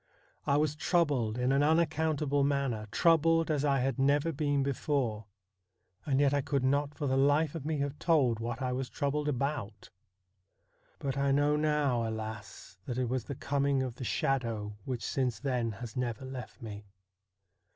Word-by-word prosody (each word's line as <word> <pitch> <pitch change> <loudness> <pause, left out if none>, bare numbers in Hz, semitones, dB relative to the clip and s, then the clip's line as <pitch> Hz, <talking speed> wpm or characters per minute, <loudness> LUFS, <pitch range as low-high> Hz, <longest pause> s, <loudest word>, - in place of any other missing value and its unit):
I 140 - +3
was 150 0 +1
troubled 145 -9 +1
in 125 +1 +1
an 140 +1 +3
unaccountable 155 -2 +2
manner, 135 -6 0
troubled 165 +3 +3
as 145 -2 0
I 140 -3 +2
had 130 -1 -1
never 145 +4 +3
been 145 -2 0
before; 135 -5 -1 0.8
and 135 -2 +2
yet 140 -1 +3
I 145 - +2
could 135 -1 -1
not 140 +2 +1
for 150 - -3
the 130 -1 +1
life 145 +3 +3
of 155 -3 -5
me 160 -1 0
have 140 +1 -3
told 135 -9 +2
what 115 +2 -4
I 125 - 0
was 130 0 -3
troubled 145 +2 -1
about. 130 -7 -3 1.1
But 140 0 -3
I 140 0 +2
know 145 +2 +3
now, 150 -6 +1
alas! 110 -4 -7
that 120 - -4
it 125 -2 0
was 125 -2 -2
the 140 - -5
coming 140 0 0
of 125 -2 -5
the - - -6
shadow 115 -5 -1
which 125 -3 -3
since 130 -3 -1
then 125 -5 -1
has 115 +1 -8
never 125 0 -3
left 130 0 -8
me. 105 -2 -8
135 Hz, 170 wpm, -31 LUFS, 125-145 Hz, 1.1 s, I